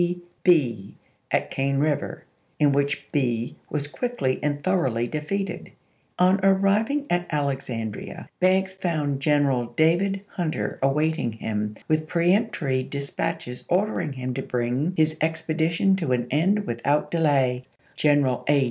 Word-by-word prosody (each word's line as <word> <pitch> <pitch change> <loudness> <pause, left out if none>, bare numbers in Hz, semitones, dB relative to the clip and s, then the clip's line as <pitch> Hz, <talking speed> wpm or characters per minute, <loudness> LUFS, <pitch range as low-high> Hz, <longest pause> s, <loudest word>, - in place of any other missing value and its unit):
P. 175 0 0 0.2
Bee 120 - +2 0.3
at - - 0
Cane 135 0 0
River, 145 0 -1 0.3
in 145 -1 +4
which 140 0 0
Bee 120 -5 0
was 145 -1 -2
quickly 145 - -2
and 145 -1 -1
thoroughly 130 -12 +1
defeated. 160 +9 -3 0.5
On 185 +2 +4
arriving 200 +9 +3
at 175 0 +1
Alexandria, 135 -7 -3
Banks 190 +1 +3
found 155 -7 -1
General 140 -4 +2
David 190 +5 +2
Hunter 165 -4 -2
awaiting 140 -2 +1
him 105 -1 -3
with 155 0 +1
peremptory 170 - +1
dis 140 +2 -6
patches 165 -6 -3
ordering 180 -5 0
him 130 -1 -4
to 135 - -3
bring 125 +7 -1
his 155 0 +2
expedition 160 +3 +1
to 160 -9 0
an 120 -1 0
end 190 +8 +2
without 140 +4 0
delay. 135 -6 +2 0.3
General 145 -4 +2
A. 145 -1 +5
150 Hz, 130 wpm, -25 LUFS, 130-175 Hz, 0.5 s, A